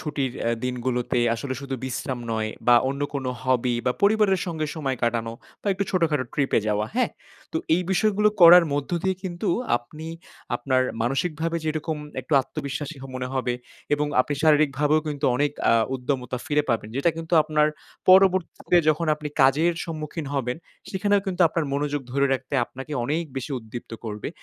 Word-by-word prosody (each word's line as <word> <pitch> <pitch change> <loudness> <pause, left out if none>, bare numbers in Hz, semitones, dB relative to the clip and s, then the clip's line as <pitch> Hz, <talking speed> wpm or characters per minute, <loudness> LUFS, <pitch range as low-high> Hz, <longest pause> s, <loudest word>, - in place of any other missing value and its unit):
ছুটির 140 -5 -2
অ্যা 115 - +1
দিনগুলোতে 125 -1 -1 0.2
আসলে 130 +3 -4
শুধু 135 -1 -4
বিশ্রাম 130 0 -3
নয় 110 -1 -1 0.2
বা, 120 - +8
অন্য 140 +1 -4
কোনো 135 -2 -2
হবি 125 -1 +1
বা, 125 - +3
পরিবারের 200 -2 +4
সঙ্গে 160 -3 -2
সময় 135 -5 -2
কাটানো 115 -1 0 0.3
বা, - - -11
একটু 200 +1 -1
ছোটখাটো 160 -7 +1
ট্রিপে 140 -2 +2
যাওয়া। 105 0 0
হ্যাঁ? - - +1 0.4
তো - - -1 0.2
এই 180 - +1
বিষয়গুলো 210 +1 +3
করার 175 +1 +10
মধ্য 145 -1 -2
দিয়ে 190 -1 0
কিন্তু 185 +1 -3 0.3
আপনি 155 +7 -9 0.5
আপনার 130 +1 +1 0.2
মানসিকভাবে 160 +6 -1
যেরকম 155 0 -2 0.2
একটু - - -9
আত্মবিশ্বাসী 140 +3 -5 0.2
মনে 125 0 -3
হবে 125 -2 0 0.4
এবং 150 0 -1
আপনি 145 +3 -1
শারীরিকভাবেও 150 -1 +3
কিন্তু 145 -1 -4
অনেক 145 +2 +2 0.2
আ - - +5 0.2
উদ্যমতা 130 -1 -2
ফিরে 150 0 +2
পাবেন। 115 -2 -1
যেটা 140 +5 +3
কিন্তু 165 +1 -2
আপনার 150 0 +2 0.4
পরবর্তীতে 185 -2 +4
যখন 155 +2 +2
আপনি 150 0 -6
কাজের 150 +6 +4
সম্মুখীন 155 -1 -5
হবেন 125 -2 -1 0.3
সেখানেও 205 +1 +2
কিন্তু 185 -1 -3
আপনার 165 0 -1
মনোযোগ 145 0 -1
ধরে 140 +1 +3
রাখতে 135 +1 -3
আপনাকে 135 +5 -9
অনেক 155 +6 -1
বেশি 135 +3 -4
উদ্দীপ্ত 115 +1 -9
করবে। 105 -2 -4
145 Hz, 160 wpm, -24 LUFS, 130-165 Hz, 0.5 s, করার